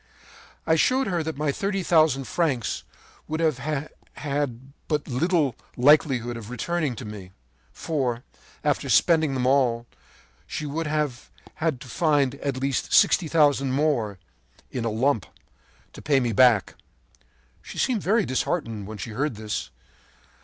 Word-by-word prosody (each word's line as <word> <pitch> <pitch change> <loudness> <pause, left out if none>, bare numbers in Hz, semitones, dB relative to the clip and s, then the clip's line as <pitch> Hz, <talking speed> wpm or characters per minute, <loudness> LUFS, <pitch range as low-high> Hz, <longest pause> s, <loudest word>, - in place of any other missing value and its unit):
“I 160 - +3
showed 255 - +3
her 175 -4 -1
that 160 -2 -4
my 150 -1 0
thirty 195 +4 -2
thousand 155 -6 +3
francs 135 -6 -1 0.5
would 155 +1 -3
have 150 -1 -1 1.0
but 150 -2 -1
little 145 0 +1 0.2
likelihood 125 -3 +3
of 110 -1 -9
returning 145 +2 -2
to 115 - -8
me; 100 -3 -9 0.4
for, 130 -6 -2 0.4
after 145 -2 0
spending 155 +4 +4
them 125 -1 0
all, 125 -3 +2 0.6
she 155 - -4
would 155 +2 -3
have 150 -5 -2 0.3
to 150 -6 -1
find 145 -1 +2
at 140 -1 -3
least 135 0 -1
sixty 175 - +5
thousand 145 -4 +3
more, 130 -9 0 0.5
in 125 -3 -3
a - - +1
lump, 115 0 +1 0.7
to - - -10
pay 140 -2 +3
me 120 -3 -1
back. 115 -4 +4 0.9
“She - - -10
seemed 240 -6 +1
very 205 +3 +2
disheartened 115 - -2
when 110 0 -7
she 105 +4 -6
heard 135 +3 -2
this. 105 - -4
140 Hz, 140 wpm, -25 LUFS, 120-155 Hz, 1.0 s, sixty